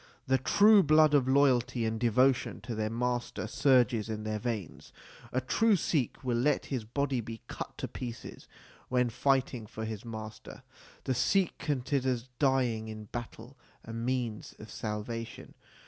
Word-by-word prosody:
The 130 0 +2
true 205 - +6
blood 155 -1 +5
of 135 -3 +4
loyalty 125 -3 +3
and 110 0 -2
devotion 125 +3 +2
to 120 - -5
their 110 -1 -1
master 120 +1 -2
surges 125 -5 +2
in 110 -1 -4
their 110 0 -2
veins. 110 - -5 0.4
A 130 - +1
true 220 - +3
Sikh 150 -6 -1
will 120 -2 0
let 145 +3 +1
his 125 -4 -1
body 135 +2 -1
be 115 0 -8
cut - - -7
to - - -4
pieces 120 -2 -8 0.4
when 125 -1 +1
fighting 130 -3 0
for 110 0 -6
his 110 -2 -5
master. 110 +2 -8 0.4
The 130 - 0
Sikh 185 +9 +2
considers 130 -3 -1
dying 125 -6 +1
in 110 -1 -8
battle 120 +2 -7 0.3
a 115 - -7
means 115 -1 -3
of 110 0 -11
salvation. 110 +2 -5
125 Hz, 150 wpm, -30 LUFS, 110-135 Hz, 0.4 s, true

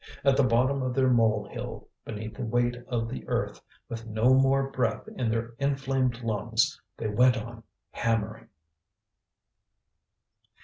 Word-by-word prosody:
At 140 -1 +5
the 140 - +4
bottom 130 +2 +2
of 130 -1 -2
their 130 -1 +3
mole 115 -3 +3
hill, - - -6 0.2
beneath 110 0 -6
the 130 - -6
weight 120 +1 +1
of 115 -2 -1
the 65 - -6
earth, - - -2 0.3
with 115 0 -6
no 110 +4 +3
more 135 +1 +3
breath 130 +10 -1
in 125 - 0
their 115 +1 -2
inflamed 135 -3 0
lungs, 110 +1 0 0.2
they 110 - -2
went 125 +4 +4
on 115 +1 -7 0.3
hammering. 115 -1 -1
120 Hz, 140 wpm, -28 LUFS, 115-130 Hz, 0.3 s, At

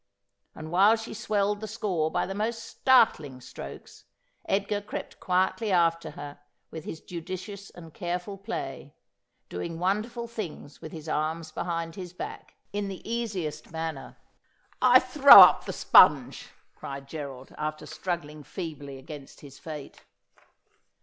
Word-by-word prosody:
And 155 0 -8
while 200 +5 +6
she 225 0 -7
swelled 205 -1 0
the 215 - -4
score 195 -8 -1
by - - 0
the 195 - -5
most 225 +3 -2
startling 155 - +3
strokes, 95 - -10 0.4
Edgar 200 +1 0
crept 205 - -7
quietly 190 +4 0
after 170 -2 +2
her 145 0 -8 0.3
with 160 -1 -8
his 160 - -7
judicious 185 +3 -7
and 165 -3 -13
careful 180 +2 -4
play 215 +4 -6 0.3
— - - -50
doing 165 -1 -4
wonderful 215 +7 -1
things 205 -10 -7
with 155 - -8
his 160 -1 -9
arms 155 +1 -2
behind 165 0 -3
bis 180 -1 -8
back, - - -8 0.2
in 205 0 -2
the 195 0 -8
easiest 215 -12 -3
manner. 160 -3 -5 0.4
' - - -35
I - - +8
throw - - +9
up - - +7
the - - -3
sponge,' - - +5 0.3
cried 135 0 -8
Gerald, 140 -3 -8
after 155 0 -4
struggling 155 -1 -5
feebly 145 -6 -7
against 140 +1 -11
his 140 -2 -13
fate. 150 -3 -9
170 Hz, 145 wpm, -27 LUFS, 155-205 Hz, 0.4 s, throw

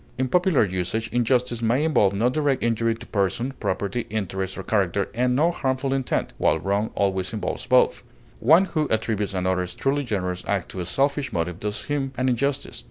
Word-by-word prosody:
In 130 0 0
popular 180 -5 +3
usage, 95 +4 -2
injustice 120 0 +1
may 120 +5 +2
involve 105 -11 +3
no 110 +5 +2
direct 140 +1 +1
injury 115 0 +1
to 120 +1 -11
person, 105 +6 -1
property, 100 +5 -2
interest, 95 -3 -3
or 95 - -5
character, 100 -2 0
and 125 +1 +1
no 160 +6 +3
harmful 135 -4 -1
intent, 135 -2 -1
while - - +3
wrong 100 +2 -1
always 95 -1 0
involves 110 - -4
both; 125 0 +4 0.4
one 160 +10 +6
who 155 -5 -1
attributes 105 -2 -1
another's 90 -1 -1
truly 140 +1 0
generous 90 -6 -2
act 100 -4 -1
to 95 - -7
a 90 - -3
selfish 140 +6 0
motive 85 -1 -2
does 105 0 -3
him 140 -2 -2
an 130 0 +1
injustice. 135 +3 -1
115 Hz, 180 wpm, -24 LUFS, 95-135 Hz, 0.4 s, one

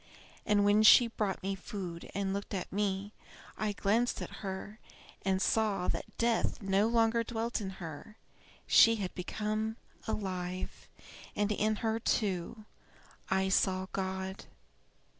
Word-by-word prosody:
And 205 -1 +4
when 205 +1 +5
she 220 +3 +9
brought 205 -5 -2
me 195 +1 -1
food 180 -3 -6
and 195 -1 -1
looked 200 0 -4
at 185 - -5
me, 200 0 -1 0.4
I 215 -1 -1
glanced 220 +4 +1
at - - -7
her 200 +2 -6 0.4
and 190 0 +1
saw 205 -2 +1
that - - -4
death 230 0 +1
no 195 +1 +2
longer 230 0 +3
dwelt 230 0 -2
in 195 - -3
her; 170 +5 -8 0.5
she 230 0 +7
had 195 -4 -4
become 215 +4 -2 0.3
alive, 185 -3 -4 0.5
and 205 0 +1
in 215 +1 +1
her, 225 0 +1
too, 210 -1 -1 0.6
I 190 0 +2
saw 185 -1 +2
God. 190 0 -4
205 Hz, 135 wpm, -32 LUFS, 190-220 Hz, 0.6 s, she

